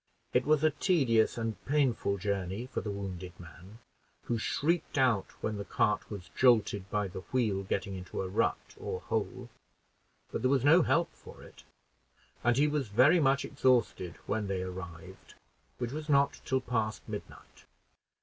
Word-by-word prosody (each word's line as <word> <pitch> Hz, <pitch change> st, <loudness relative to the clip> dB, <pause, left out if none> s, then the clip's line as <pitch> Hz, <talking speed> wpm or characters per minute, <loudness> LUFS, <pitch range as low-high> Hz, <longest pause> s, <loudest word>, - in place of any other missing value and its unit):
It -, -, +2 dB
was 155 Hz, -1 st, +3 dB
a 155 Hz, -, +5 dB
tedious 135 Hz, -, +2 dB
and 115 Hz, -4 st, -3 dB
painful 130 Hz, -8 st, +1 dB
journey 100 Hz, +2 st, -2 dB
for 130 Hz, -, -4 dB
the 105 Hz, -, -5 dB
wounded 95 Hz, -3 st, -6 dB
man, 90 Hz, +4 st, -13 dB, 0.5 s
who 120 Hz, -1 st, -1 dB
shrieked 160 Hz, +7 st, 0 dB
out 125 Hz, -7 st, +3 dB
when 110 Hz, -1 st, -2 dB
the 100 Hz, -, -4 dB
cart 105 Hz, +1 st, 0 dB
was 100 Hz, -4 st, -8 dB
jolted 110 Hz, -6 st, +3 dB
by 105 Hz, -1 st, 0 dB
the 95 Hz, -, -7 dB
wheel 110 Hz, -6 st, +1 dB
getting 100 Hz, 0 st, -2 dB
into 95 Hz, 0 st, -5 dB
a -, -, -3 dB
rut 95 Hz, -, -1 dB
or -, -, -4 dB
hole; -, -, -3 dB, 0.8 s
but -, -, -3 dB
there 130 Hz, -, +2 dB
was 135 Hz, -1 st, +2 dB
no 165 Hz, +5 st, +7 dB
help 170 Hz, +1 st, +1 dB
for -, -, -14 dB
it, -, -, -15 dB, 0.8 s
and 120 Hz, 0 st, +3 dB
he 145 Hz, +2 st, +4 dB
was 145 Hz, -4 st, -1 dB
very 130 Hz, -, +5 dB
much 140 Hz, -2 st, +2 dB
exhausted 125 Hz, -, +1 dB
when 105 Hz, -1 st, -1 dB
they 95 Hz, -1 st, -2 dB
arrived, 90 Hz, -3 st, -9 dB, 0.4 s
which 120 Hz, -, -3 dB
was 155 Hz, +2 st, -6 dB
not 140 Hz, 0 st, +3 dB
till 130 Hz, -1 st, +1 dB
past 110 Hz, -4 st, -2 dB
midnight. 105 Hz, -2 st, -9 dB
110 Hz, 165 wpm, -31 LUFS, 100-135 Hz, 0.8 s, no